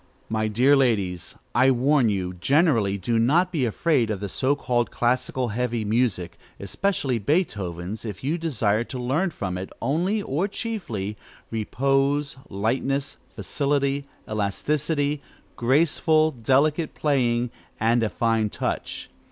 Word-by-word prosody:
My 110 0 0
dear 125 +7 +4
ladies, 100 -10 0 0.2
I 125 +3 +5
warn 130 0 +3
you, 95 -3 -2
generally, 115 - +2
do 115 +4 0
not 165 +10 +3
be 150 -8 0
afraid 125 0 +1
of 105 -3 -2
the 100 0 -4
so 130 +8 +1
called 120 -4 0
classical, 125 +1 0
heavy 120 0 -1
music, 110 -5 0 0.2
especially 135 - -1
Beethoven's, 100 - -1
if 105 -2 -7
you 155 +6 0
desire 115 -9 +1
to 130 - -6
learn 135 +10 0
from 95 - -4
it, 95 - -6
only 175 - 0
or 155 +7 0
chiefly, 115 - -4 0.3
repose, 135 +5 +1
lightness, 130 +7 -1 0.2
facility, 140 -1 0 0.2
elasticity, 145 +8 -1 0.3
graceful, 155 +4 +3
delicate 145 +5 +1
playing, 125 -5 +1 0.3
and 115 +2 +3
a 110 - +1
fine 115 -2 +1
touch. - - -3
125 Hz, 125 wpm, -24 LUFS, 110-145 Hz, 0.3 s, I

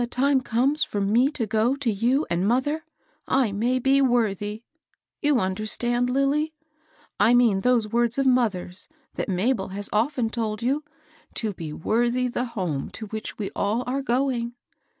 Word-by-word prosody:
time 270 +2 +2
comes 255 +6 +2
for 205 - -3
me 225 +7 +3
to 265 -6 -2
go 220 +4 +1
to 275 -5 -1
you 245 +8 +1
and 175 +3 0
mother, 290 +7 +1 0.4
I 260 -5 +2
may 235 +6 +1
be 270 +2 +3
worthy^ 220 -4 0 0.3
— - - -49
you 290 -4 +3
under 190 +2 -2
stand, 240 +2 0
Lilly? 285 +4 +1 0.6
I 240 - +5
mean 230 -6 +4
those 245 -2 +2
words 235 +2 +1
of 275 - +1
mother's, 210 -8 +1 0.3
that - - -3
Mabel 195 +3 0
has 200 +1 -5
often 230 +1 +1
told 220 -2 -3
you, 275 +5 0 0.3
— - - -30
to 215 -3 0
be 165 -4 -6
^ - - -8
wortiby 240 +6 +1
l^e 245 +1 -1
home 180 - -3
to 220 - -6
which 220 0 -5
we 205 -3 -4
all 215 +5 0
are 265 +2 -1
going.' 245 -2 0
240 Hz, 175 wpm, -25 LUFS, 210-260 Hz, 0.6 s, I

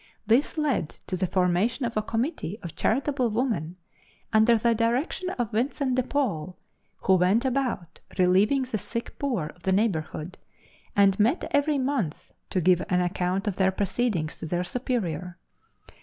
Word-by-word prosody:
This 240 +9 +2
led 285 - 0
to 185 - -3
the 185 0 0
formation 190 +9 +1
of 235 - -3
a 215 - +2
committee 225 - -2
of 170 - -7
charitable 260 +1 +1
women, 210 - -1 0.6
under 220 +2 +5
the 235 +1 +2
direction 245 - 0
of 240 -3 -1
Vincent 260 +4 0
de 255 - +2
Paul, 200 - -2 0.4
who 190 -1 +4
went 190 +8 +3
about 255 -10 -2 0.2
relieving 195 +9 +4
the 250 -4 -3
sick 230 +4 -5
poor 230 - -1
of 175 - -24
the 190 - 0
neighborhood, 185 -4 -1 0.6
and 200 -1 +4
met 235 - +2
every 285 +1 +2
month 255 - -2 0.2
to 185 - 0
give 180 +1 +4
an 180 - +3
account 180 +2 -1
of 205 -3 -2
their 190 -1 +3
proceedings 195 -4 -1
to - - -6
their 175 +2 -1
superior. 180 - -3
215 Hz, 155 wpm, -26 LUFS, 180-250 Hz, 0.6 s, under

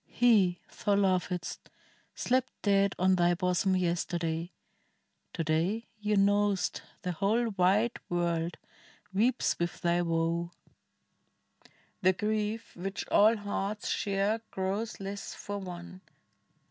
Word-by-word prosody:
He 205 -7 +4 0.3
thou 205 -1 +3
lovedst 185 -3 0 0.6
slept 255 0 +1
Dead 200 -1 +3
on 185 +1 +3
thy 175 0 +3
bosom 180 +1 +1
yesterday: 170 -1 -1 0.8
to 165 - -2
day 170 +9 0
Thou 210 0 +2
know'st 205 0 +2 0.2
the 180 - -1
whole 215 +7 +1
wide 200 +5 +2
world 170 -1 -1 0.6
weeps 235 +6 +2
with 170 0 -2
thy 175 0 +2
woe: 170 0 0 1.5
The 185 0 +5
grief 215 +2 -2
which 195 +2 -4
all 220 +2 +5
hearts 205 0 -3
share 200 +2 0
grows 195 +4 -3
less 195 0 -6
for 205 0 -5
one. 180 0 -8
195 Hz, 110 wpm, -30 LUFS, 175-205 Hz, 1.5 s, The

